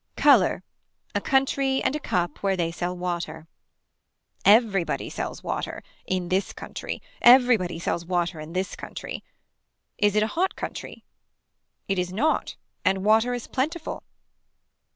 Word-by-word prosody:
Color. - - +5 0.5
A - - 0
country 270 0 +2
and 280 - +1
a - - -2
cup 175 - -1
where 195 -1 0
they 165 -2 0
sell 175 +1 -3
water. 170 -3 -4 1.0
Everybody 205 -4 +3
sells - - -5
water. - - -4 0.2
In 185 -2 -1
this 190 +1 0
country. - - -6 0.2
Everybody 240 -9 +6
sells 170 0 -2
water 175 -1 -1
in 155 +2 -8
this 185 +1 -2
country. - - -7 0.8
Is 205 -1 +3
it 210 - +4
a 215 - -3
hot 370 +3 +1
country. - - -7 0.8
It 195 -2 0
is 180 0 -2
not 285 +12 0 0.3
and 190 0 +1
water 220 +3 +4
is 240 - -5
plentiful. 310 +5 -3
195 Hz, 135 wpm, -25 LUFS, 175-245 Hz, 1.0 s, Everybody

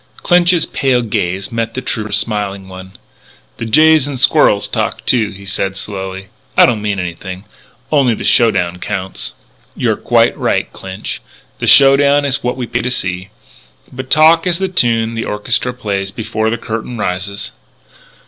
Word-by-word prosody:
Clinch's 175 -1 +3
pale 130 -6 0
gaze 95 -2 -2
met 115 0 -3
the - - -2
trooper's 110 -4 -1
smiling 100 -3 -2
one: 95 0 -11 0.6
"The 115 - -5
jays 155 +4 +5
and 140 -3 -5
squirrels 135 -6 +4
talk - - -3
too," 115 -5 +2
he 100 -1 -11
said 95 0 -2
slowly. 95 -1 -5 0.3
"It - - +8
don't 115 -4 0
mean 105 -2 -2
anything. 90 +1 -6 0.5
Only 135 -6 +3
the - - -7
show 120 -1 +4
down 90 -4 -2
counts." 95 -2 -4 0.4
"You're - - 0
quite - - +2
right, - - -1
Clinch. 95 0 -6 0.4
The - - -2
show 135 -1 +7
down 145 0 +3
is 135 -1 -1
what 125 +1 -2
we 125 - -3
pay 120 +1 -2
to 125 - -2
see. 95 -6 -1 0.6
But 130 0 -7
talk 160 +3 +5
is 175 -2 +1
the 190 +1 -1
tune 115 -9 +1
the 115 0 -3
orchestra 120 +4 -1
plays 100 -5 -3
before 110 +1 -2
the 115 - -1
curtain 115 +2 -5
rises." 100 +1 -4
110 Hz, 165 wpm, -15 LUFS, 95-130 Hz, 0.6 s, It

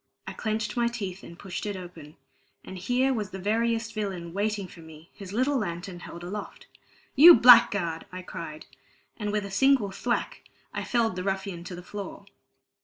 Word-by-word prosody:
I - - -6
clenched 215 -1 -2
my 240 -1 +2
teeth 200 -6 -5
and 170 - -12
pushed 190 -1 -6
it 205 - -3
open; 170 -4 -10 0.5
and 190 - -8
here 250 +7 +1
was 210 -5 -3
the 190 - -7
veriest 225 +3 0
villain 190 -6 -4
waiting 205 0 -1
for 175 - -15
me, 160 0 -14
his 195 -3 -10
little 260 +5 +1
lantern 175 -2 -5
held 170 0 -9
aloft. 200 +4 -7 0.5
"You 335 +5 +11
blackguard!" 205 -9 +6
I 185 0 -7
cried, 165 -4 -8 0.5
and 210 -2 -3
with 210 -1 -1
a 200 - -8
single 245 -1 +3
thwack 240 +5 -2 0.3
I - - -3
felled 230 -5 0
the 180 - -4
ruffian 190 -2 -3
to 180 - -7
the 175 - -10
floor. 205 +1 -8
200 Hz, 180 wpm, -27 LUFS, 180-225 Hz, 0.5 s, You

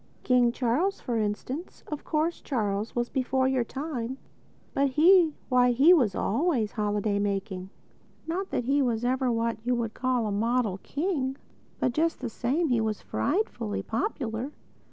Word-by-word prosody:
King 245 -2 +4
Charles, 265 +12 0
for 235 -2 -2
instance—of 260 - -4
course 320 +2 -1
Charles 210 -5 -2
was 240 0 0
before 260 0 0
your 260 -2 +2
time—but 270 +1 -4
he!—why, 300 -5 +4
he 285 +9 +7
was 240 - +3
always 240 - +1
holiday 210 -1 0
making. 195 -2 -2 0.6
Not 370 +4 -3
that - - -1
he 275 +4 +2
was 240 -3 0
ever 255 0 +1
what 230 -1 -1
you 250 +1 +1
would 230 -2 -2
call 255 -2 0
a 210 - -1
model 220 -1 0
king. 285 -4 -2 0.4
But 255 - +1
just 325 +6 0
the 250 - -3
same, 275 +9 0
he 240 -3 +2
was 215 -2 -1
frightfully 265 - -1
popular. 235 - -2
250 Hz, 145 wpm, -27 LUFS, 225-285 Hz, 0.6 s, he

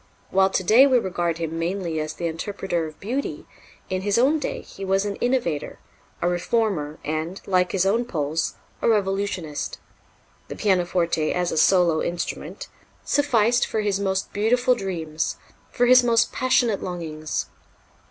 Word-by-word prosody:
While 190 0 +4
to 190 - -1
day 235 +9 +7
we 260 -2 +4
regard 175 -6 -1
him 165 0 -3
mainly 170 -1 -2
as 155 +1 -4
the 170 - -4
interpreter 170 0 -2
of 155 - -12
beauty, 255 +8 -3 0.4
in 185 -1 -2
his 205 +2 +1
own 280 +6 +3
day - - -4
he 195 - -10
was 195 +1 +1
an 200 -1 -2
innovator, 240 - -1 0.5
a - - +3
reformer 175 -4 0
and, 160 +5 -3
like 180 -2 +2
his 190 -1 +1
own 225 +5 +2
Poles, 160 -5 -2 0.3
a - - +2
revolutionist. 195 -7 -1 0.7
The - - -7
pianoforte 175 -4 +1
the - - +1
pianoforte - - 0
as 175 -1 0
a - - -2
solo 170 -1 +4
instrument 175 - -4 0.4
sufficed 245 -4 +2
for 220 - -1
his 205 -2 0
most 190 -1 -1
beautiful 245 +4 +3
dreams, 165 -8 -3 0.3
for 245 - +1
his 255 +1 +7
most 230 -1 +2
passionate 245 -5 +2
longings. 160 -4 -4
190 Hz, 160 wpm, -24 LUFS, 170-225 Hz, 0.7 s, day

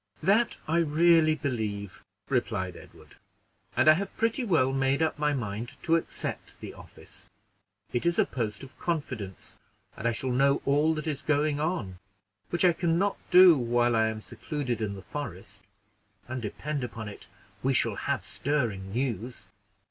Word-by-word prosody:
"That 210 +7 +3
I 165 +2 +2
really 165 0 +4
believe," 110 - -4 0.2
replied 105 -8 -1
Edward; - - -15 0.6
"and - - +4
I 155 - +10
have 195 +5 -4
pretty 230 +3 +1
well 145 - +2
made 135 +1 +1
up 160 -2 0
my 150 0 +2
mind 115 -3 -4
to 165 - +3
accept 165 - -4
the - - -8
office. - - -13 0.6
It 120 +7 0
is 170 - +1
a - - +4
post 110 -2 -4
of 135 - -13
confidence, 130 - -4 0.4
and 115 - -2
I - - +3
shall 125 +3 -2
know 140 +3 +3
all 150 +3 +3
that 155 - -4
is 150 -3 -2
going 150 -1 +1
on, 150 - -2 0.5
which 175 +1 +2
I 175 - +6
can 165 0 +1
not 200 +3 0
do 180 -2 +9
while 120 -2 +2
I 110 0 +3
am 110 -1 -4
secluded 135 -7 -4
in 100 -2 -2
the 95 - -10
forest; 105 -7 -7 0.7
and, 130 0 -4
depend 140 +6 -4
upon 115 -3 -6
it, 100 - -10 0.3
we 135 0 +1
shall - - +2
have - - -2
stirring 115 -10 -2
news." 120 0 -3
135 Hz, 165 wpm, -28 LUFS, 115-155 Hz, 0.7 s, I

